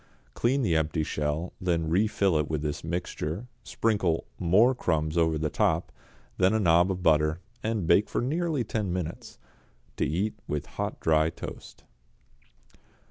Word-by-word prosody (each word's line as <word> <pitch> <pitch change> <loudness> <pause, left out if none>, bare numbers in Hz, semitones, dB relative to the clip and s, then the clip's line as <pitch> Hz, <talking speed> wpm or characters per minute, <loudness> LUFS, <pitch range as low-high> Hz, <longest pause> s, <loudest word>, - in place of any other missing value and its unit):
Clean 130 +3 +1
the 85 -8 +2
empty 80 0 0
shell, 75 +3 -2
then 85 -3 0
refill 95 -1 +2
it 75 - -1
with 75 -1 -2
this 75 -1 -3
mixture, 85 +3 -3 0.2
sprinkle 100 -9 0
more 105 +9 +4
crumbs 80 -9 -1
over 80 -2 +2
the 75 0 -2
top, - - +1 0.5
then 95 +3 +4
a - - +2
nob 85 -1 +4
of 90 -1 -3
butter, 75 0 +3 0.2
and 110 -4 -1
bake 85 +6 +4
for - - -1
nearly 155 +1 0
ten 105 -3 -2
minutes. 85 -2 -5 0.6
To - - +1
eat 95 +9 -1
with 75 -1 -2
hot - - -4
dry 80 0 +3
toast. - - -9
85 Hz, 150 wpm, -27 LUFS, 80-105 Hz, 0.6 s, more